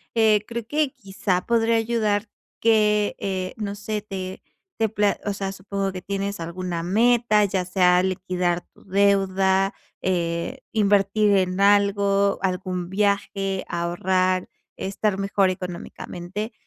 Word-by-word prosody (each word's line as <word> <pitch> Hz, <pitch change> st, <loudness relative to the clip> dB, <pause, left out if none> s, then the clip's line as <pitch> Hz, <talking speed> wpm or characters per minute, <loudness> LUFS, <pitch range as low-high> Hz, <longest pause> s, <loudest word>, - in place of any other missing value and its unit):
Eh, 215 Hz, -2 st, +4 dB
creo 235 Hz, -1 st, -5 dB
que, 295 Hz, +1 st, +1 dB
quizá 195 Hz, -6 st, -2 dB
podría 230 Hz, 0 st, +2 dB
ayudar 220 Hz, -2 st, 0 dB, 0.3 s
que, 210 Hz, -2 st, +3 dB
eh, 185 Hz, -2 st, -3 dB
no 205 Hz, -2 st, -4 dB
sé, 210 Hz, +1 st, -4 dB
te 190 Hz, -2 st, -6 dB, 0.4 s
te 220 Hz, -1 st, +2 dB
pla 205 Hz, -1 st, +1 dB
o 205 Hz, -, 0 dB
sea, 195 Hz, -1 st, -3 dB
supongo 195 Hz, 0 st, -3 dB
que 185 Hz, -1 st, -7 dB
tienes 200 Hz, +1 st, -3 dB
alguna 170 Hz, 0 st, -4 dB
meta, 225 Hz, +3 st, +3 dB
ya 190 Hz, -2 st, -1 dB
sea 180 Hz, -1 st, +4 dB
liquidar 180 Hz, -2 st, -1 dB
tu -, -, -20 dB
deuda, 195 Hz, -1 st, +2 dB, 0.3 s
eh, 170 Hz, -2 st, -1 dB
invertir 205 Hz, 0 st, +3 dB
en 185 Hz, -1 st, +1 dB
algo, 200 Hz, 0 st, +3 dB
algún 180 Hz, -1 st, -2 dB
viaje, 195 Hz, -1 st, 0 dB
ahorrar, 185 Hz, +2 st, 0 dB, 0.3 s
estar 195 Hz, +1 st, -1 dB
mejor 195 Hz, -1 st, +2 dB
económicamente, 180 Hz, +3 st, -6 dB
195 Hz, 125 wpm, -23 LUFS, 185-210 Hz, 0.4 s, Eh